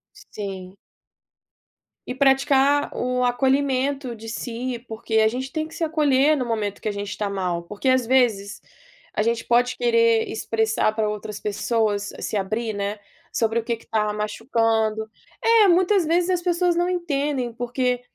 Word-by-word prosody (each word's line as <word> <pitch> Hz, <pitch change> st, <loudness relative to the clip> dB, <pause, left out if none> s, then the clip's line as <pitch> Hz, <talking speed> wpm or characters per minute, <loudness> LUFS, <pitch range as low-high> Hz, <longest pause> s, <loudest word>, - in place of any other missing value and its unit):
Sim. 190 Hz, -2 st, -8 dB, 1.3 s
E 250 Hz, -, -3 dB
praticar 275 Hz, +1 st, +3 dB
o 250 Hz, 0 st, -1 dB
acolhimento 265 Hz, 0 st, 0 dB
de 225 Hz, 0 st, -9 dB
si, 240 Hz, +1 st, -4 dB
porque 220 Hz, 0 st, -5 dB
a 220 Hz, 0 st, +5 dB
gente 260 Hz, +4 st, -3 dB
tem 315 Hz, -1 st, -2 dB
que 320 Hz, -, -13 dB
se -, -, -3 dB
acolher 300 Hz, -2 st, +3 dB
no 255 Hz, -, -2 dB
momento 215 Hz, -4 st, -2 dB
que -, -, -4 dB
a -, -, +1 dB
gente 205 Hz, 0 st, -5 dB
tá 205 Hz, -1 st, -2 dB
mal. 180 Hz, -3 st, -2 dB
Porque, 210 Hz, +9 st, -2 dB
às 255 Hz, -1 st, +3 dB
vezes, 220 Hz, -6 st, +1 dB, 0.5 s
a -, -, 0 dB
gente 230 Hz, +1 st, 0 dB
pode 245 Hz, +1 st, +2 dB
querer 230 Hz, -2 st, +3 dB
expressar 220 Hz, -1 st, 0 dB
para 215 Hz, -1 st, 0 dB
outras 210 Hz, 0 st, -5 dB
pessoas, 210 Hz, -1 st, -1 dB
se 215 Hz, -, -2 dB
abrir, 215 Hz, +4 st, -2 dB
né, 205 Hz, 0 st, -3 dB, 0.4 s
sobre 230 Hz, -5 st, +1 dB
o -, -, -5 dB
que 235 Hz, 0 st, -1 dB
que 230 Hz, -, -18 dB
está 210 Hz, -1 st, -1 dB
machucando. 220 Hz, 0 st, 0 dB, 0.4 s
É, 455 Hz, -2 st, +6 dB
muitas 365 Hz, 0 st, +3 dB
vezes 345 Hz, +3 st, +1 dB
as 360 Hz, -1 st, +1 dB
pessoas 350 Hz, -1 st, +1 dB
não 350 Hz, +1 st, +1 dB
entendem, 290 Hz, -8 st, -1 dB
porque 245 Hz, +1 st, -1 dB
235 Hz, 160 wpm, -23 LUFS, 215-275 Hz, 1.3 s, É